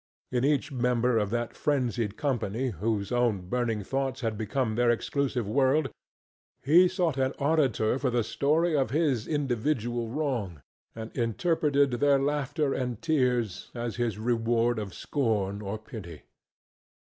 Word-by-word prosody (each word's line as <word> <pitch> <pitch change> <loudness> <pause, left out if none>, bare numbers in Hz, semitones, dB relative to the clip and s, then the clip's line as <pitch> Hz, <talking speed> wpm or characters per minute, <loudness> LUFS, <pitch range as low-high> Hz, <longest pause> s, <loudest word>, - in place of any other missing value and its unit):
In 125 -1 0
each 145 +1 +1
member 125 -2 +1
of 105 -2 -1
that 120 +1 -2
frenzied 120 -7 -1
company 125 -3 -1
whose 105 +1 -2
own 115 -7 +1
burning 115 -3 -1
thoughts 135 +3 -2
had 115 -3 -1
become 110 +2 -1
their 120 +2 +2
exclusive 125 -1 0
world 135 +5 +2 0.7
he 170 +7 +6
sought 175 -5 0
an 130 +1 +1
auditor 140 -6 +1
for 135 - 0
the 120 -1 +1
story 155 +8 +1
of 135 -5 +1
his 135 -5 +1
individual 120 -4 -1
wrong, 115 - -3 0.3
and 110 0 -8
interpreted 140 - +1
their 140 +3 +3
laughter 145 +1 0
and 125 -4 -3
tears 125 - 0
as 120 -1 -4
his 120 -4 -1
reward 115 0 +1
of 100 -3 -6
scorn 105 -7 -1
or 100 +1 -4
pity. 105 - -10
120 Hz, 140 wpm, -28 LUFS, 110-140 Hz, 0.7 s, he